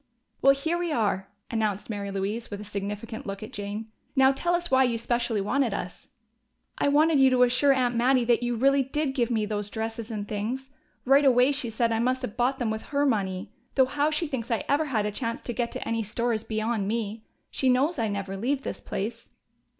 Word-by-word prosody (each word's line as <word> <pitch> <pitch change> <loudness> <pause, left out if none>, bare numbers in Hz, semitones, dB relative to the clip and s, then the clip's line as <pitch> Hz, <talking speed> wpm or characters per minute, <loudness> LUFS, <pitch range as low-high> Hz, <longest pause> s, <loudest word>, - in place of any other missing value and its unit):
"Well, 275 +1 +6
here 320 +5 -1
we 350 -2 -1
are!" 200 -6 0 0.2
announced 215 -3 -1
Mary 205 -2 -4
Louise, 200 +4 -3
with 205 - -6
a - - -7
significant 205 +2 -5
look 195 +1 -5
at 225 +4 -9
Jane. 205 +2 -5 0.2
"Now 265 0 +6
tell 345 +6 0
us 345 -2 -3
why 265 0 +6
you 240 -2 +1
specially 235 -2 0
wanted 245 +5 +1
us." - - -6 0.7
"I - - +2
wanted 300 +1 +4
you 265 0 +7
to 250 -1 +4
assure 250 +3 +4
Aunt 250 -2 +2
Mattie 250 +1 +3
that 240 0 +3
you 240 0 -1
really 275 +4 +4
did 270 +1 -1
give 245 -4 +1
me 220 -3 +1
those 210 -1 -3
dresses 225 +1 -4
and 210 -2 -4
things. 245 +6 -4 0.3
Right 275 +3 +5
away 255 0 +5
she 275 -4 -1
said 230 +1 0
I 225 - +1
must 255 +2 0
have 215 -3 -4
bought 255 +3 +1
them 240 -5 -1
with 220 0 -3
her 285 0 +1
money. 195 -5 -1 0.2
Though 265 - +6
how 290 +3 +1
she 310 +2 0
thinks 260 -6 -4
I 230 -4 0
ever 290 +3 +2
had 225 -8 0
a 210 - -1
chance 230 +2 -3
to 240 - -4
get 235 0 -2
to - - -5
any 230 0 0
store 230 +3 -1
is 215 0 -2
beyond 220 -2 -1
me. 220 0 -3 0.3
She 260 - +1
knows 270 +5 +2
I 225 - +1
never 200 -1 -3
leave 260 +7 -1
this - - -5
place." 210 +5 -5
235 Hz, 225 wpm, -27 LUFS, 215-265 Hz, 0.7 s, you